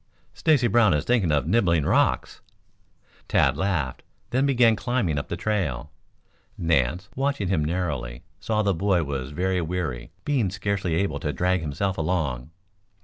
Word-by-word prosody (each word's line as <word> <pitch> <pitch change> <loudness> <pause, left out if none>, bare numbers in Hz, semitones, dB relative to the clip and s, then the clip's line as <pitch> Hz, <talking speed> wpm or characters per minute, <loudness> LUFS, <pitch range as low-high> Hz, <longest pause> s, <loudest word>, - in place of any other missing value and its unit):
"Stacy 150 -6 +2
Brown 115 -7 +4
is 75 - -1
thinking 110 -9 +2
of 75 -1 +1
nibbling 85 -5 +2
rocks." - - +1 0.9
Tad - - +3
laughed, 80 -10 -1 0.3
then 130 +3 +2
began 120 -4 +4
climbing 100 - -1
up - - -6
the - - -4
trail. 80 - -2 0.7
Nance, 85 +2 +1
watching 135 -8 -1
him 85 -6 +1
narrowly, 75 -8 -3 0.2
saw 110 -1 0
that 100 - +1
the - - +1
boy 95 0 +1
was 70 -2 -4
very 90 +4 -1
weary, 80 -8 -3 0.2
being 130 -9 +1
scarcely 95 -3 -2
able 80 -5 -1
to 75 - -2
drag 90 +2 0
himself 85 +5 -2
along. 75 -7 -1
90 Hz, 150 wpm, -25 LUFS, 75-100 Hz, 0.9 s, Brown